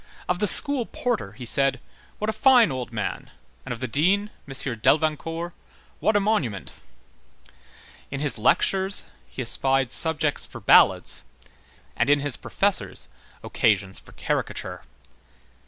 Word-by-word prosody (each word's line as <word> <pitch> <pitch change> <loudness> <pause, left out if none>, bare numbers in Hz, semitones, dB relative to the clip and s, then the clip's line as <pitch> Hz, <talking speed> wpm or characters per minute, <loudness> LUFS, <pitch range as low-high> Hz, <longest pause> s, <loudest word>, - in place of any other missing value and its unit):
Of 180 0 -1
the 210 - +2
school 275 +2 +4
porter 230 - -3
he 120 +3 -10
said: 135 +3 +4 0.4
"What 215 - -4
a 220 - -1
fine 245 - +4
old 125 -2 -6
man!" 110 -4 -5 0.3
and - - -8
of 120 -1 -6
the 130 - -3
dean, 190 - 0 0.2
M. 130 -4 -4
Delvincourt: 160 +5 -1 0.5
"What 215 - 0
a - - +4
monument!" 155 - -2 1.4
In 140 - -5
his 145 -5 -1
lectures 190 - +2 0.2
he 130 - -6
espied 135 +1 +2
subjects 155 -3 +3
for - - -11
ballads, - - +3 0.7
and - - 0
in 145 0 +4
his 140 -3 -2
professors - - -2 0.3
occasions 100 -3 0
for - - -18
caricature. - - -4
145 Hz, 135 wpm, -23 LUFS, 125-195 Hz, 1.4 s, school